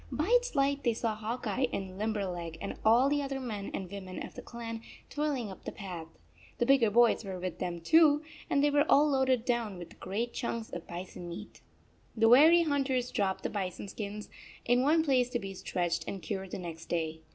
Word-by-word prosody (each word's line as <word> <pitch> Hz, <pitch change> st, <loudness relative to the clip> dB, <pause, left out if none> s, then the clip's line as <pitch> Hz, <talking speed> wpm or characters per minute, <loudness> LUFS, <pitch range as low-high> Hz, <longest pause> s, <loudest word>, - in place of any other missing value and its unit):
By 310 Hz, +6 st, -1 dB
its -, -, +1 dB
light 280 Hz, 0 st, +2 dB
they 235 Hz, -3 st, +2 dB
saw 225 Hz, -1 st, -1 dB
Hawk 225 Hz, +4 st, -4 dB
Eye 245 Hz, +5 st, +1 dB
and 190 Hz, -1 st, -5 dB
Limberleg 185 Hz, -6 st, -2 dB
and 200 Hz, -, -4 dB
all 235 Hz, +5 st, +5 dB
the 290 Hz, +1 st, +1 dB
other 275 Hz, -1 st, -3 dB
men 215 Hz, -6 st, -4 dB
and 190 Hz, -, -4 dB
women 190 Hz, -2 st, -6 dB
of -, -, -11 dB
the -, -, -8 dB
clan 230 Hz, -1 st, -7 dB, 0.3 s
toiling 280 Hz, -7 st, -1 dB
up 190 Hz, -, -12 dB
the -, -, -5 dB
path. 180 Hz, -5 st, -7 dB, 0.5 s
The 240 Hz, -, +1 dB
bigger 265 Hz, -4 st, +5 dB
boys 235 Hz, +2 st, +4 dB
were 190 Hz, -2 st, -5 dB
with 180 Hz, -1 st, -4 dB
them, 175 Hz, -2 st, -3 dB
too, 305 Hz, -, +5 dB, 0.3 s
and 280 Hz, -, +2 dB
they 290 Hz, -, +4 dB
were 290 Hz, 0 st, +4 dB
all 295 Hz, +2 st, +6 dB
loaded 265 Hz, -4 st, +2 dB
down 235 Hz, -6 st, -1 dB
with 175 Hz, -1 st, -11 dB
great 225 Hz, +5 st, -3 dB
chunks 230 Hz, -3 st, -3 dB
of 175 Hz, -1 st, -7 dB
bison 175 Hz, 0 st, -7 dB
meat! 195 Hz, +5 st, -9 dB, 0.6 s
The 225 Hz, +1 st, +5 dB
weary 315 Hz, +8 st, +8 dB
hunters 270 Hz, -5 st, 0 dB
dropped 195 Hz, -2 st, -1 dB
the -, -, -2 dB
bison 195 Hz, -1 st, -4 dB
skins 210 Hz, 0 st, -6 dB, 0.4 s
in 245 Hz, +1 st, +3 dB
one 315 Hz, +4 st, +4 dB
place 255 Hz, -5 st, +2 dB
to 245 Hz, -, -1 dB
be 195 Hz, -4 st, -6 dB
stretched 175 Hz, -2 st, -2 dB
and 195 Hz, -, -4 dB
cured 190 Hz, 0 st, -4 dB
the -, -, -5 dB
next 170 Hz, -3 st, -7 dB
day. 160 Hz, -2 st, -2 dB
225 Hz, 210 wpm, -31 LUFS, 190-270 Hz, 0.6 s, weary